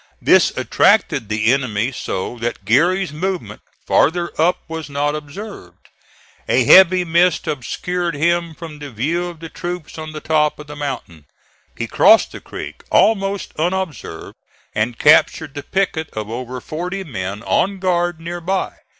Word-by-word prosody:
This - - +4
attracted 110 - +2
the 110 +3 +2
enemy 125 -3 -1
so 120 -1 -4
that 115 -4 -4
Geary's 170 - +2
movement 185 +3 -4 0.2
farther 170 +3 +2
up 175 +3 +2
was 160 -2 -6
not 145 +1 0
observed. 155 +8 -9 0.6
A - - +4
heavy 185 -1 +7
mist 170 +1 +2
obscured 170 +5 -3
him 170 +1 0
from 155 -3 -9
the 145 -1 -7
view 155 +10 -1
of 170 -2 -10
the 165 - -6
troops 175 -3 -6
on 155 0 -6
the 155 - -6
top 150 -1 +1
of 150 - -10
the 150 0 -9
mountain. 130 - -6 0.5
He - - -2
crossed - - +5
the - - -9
creek - - -8
almost 200 -3 +2
unobserved, 170 - -3 0.4
and 110 +2 -1
captured 150 0 +4
the 145 - -5
picket 170 -3 -1
of 110 0 -5
over 125 +1 -5
forty 180 +7 -4
men 100 - -5
on 195 +1 +1
guard 175 -2 0
near 170 +1 -6
by. 190 +3 -2
155 Hz, 150 wpm, -19 LUFS, 135-175 Hz, 0.6 s, heavy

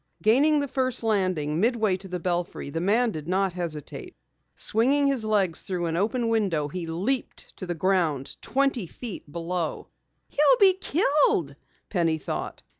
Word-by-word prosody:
Gaining 285 +8 +4
the 285 - -1
first 255 -2 -1
landing, 185 -8 0
midway 220 -2 +2
to 190 - -9
the 180 -1 -4
belfry, 175 -4 -3
the 165 - -3
man 220 +6 +2
did 155 -4 -7
not 190 0 +1
hesitate. 165 -5 -6 0.4
Swinging 270 +6 +2
his 270 -5 +2
legs 200 -6 +1
through 180 -2 -3
an 165 -1 -1
open 230 +6 0
window, 190 -10 0
he 175 +2 -5
leaped 200 +11 -3
to 185 - -6
the 175 - -2
ground 165 -6 0
twenty 270 -7 0
feet 205 -7 -8
below. 170 0 -3 0.4
"He'll 300 +12 +4
be 390 -2 +7
killed!" 290 - +1 0.4
Penny 165 -4 +1
thought. 155 - -5
190 Hz, 155 wpm, -26 LUFS, 170-245 Hz, 0.4 s, be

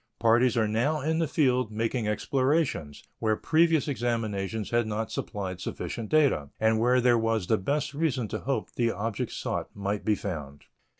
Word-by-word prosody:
Parties 120 +1 +3
are 110 -1 +3
now 120 +9 +1
in 160 +3 0
the 165 - +1
field 125 -6 +1
making 115 +1 -1
explorations, 130 - 0 0.2
where 110 -1 +2
previous 160 +3 +2
examinations 110 -6 -2
had 120 -1 +2
not 110 +1 -3
supplied 95 -3 -4
sufficient 115 -3 -5
data 140 - +3
and 110 0 +3
where 125 +2 +4
there 120 -1 +4
was 115 -3 0
the 110 +4 +2
best 140 +7 -1
reason 140 -6 0
to - - -3
hope 135 +2 -2
the 120 -1 +1
object 110 -1 -3
sought - - -3
might 100 +1 -2
be 110 - +2
found. 75 -8 -6
115 Hz, 170 wpm, -28 LUFS, 105-135 Hz, 0.2 s, where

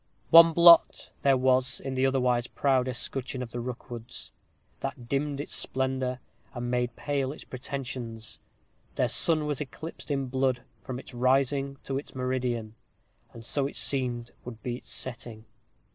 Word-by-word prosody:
One 165 0 +10
blot 170 0 +6
there 135 -1 +4
was 130 0 +2
in 135 0 -5
the 130 +1 +2
otherwise 125 -2 +1
proud 130 -2 +1
escutcheon 130 +1 -3
of 115 - -9
the 120 - -4
Rookwoods, 120 0 -6 0.5
that 120 - -5
dimmed 140 +2 -1
its 145 - -5
splendor, 130 -1 -1 0.4
and 120 0 -3
made 125 0 0
pale 140 -2 -1
its 150 - -9
pretensions: 125 -4 -6 0.6
their - - +2
sun 155 -2 +3
was 150 -2 -2
eclipsed 150 +6 -7
in 140 -2 0
blood 130 -1 0 0.2
from 130 -3 -5
its 130 - -10
rising 135 +2 +1
to 135 0 -2
its 140 - -12
meridian; 125 -4 -2 0.6
and 115 -1 -11
so 140 +2 0
it - - -9
seemed 120 -3 0
would 115 -3 -9
be 120 -1 -2
its - - -15
setting. 120 -3 -4
130 Hz, 155 wpm, -28 LUFS, 125-135 Hz, 0.6 s, One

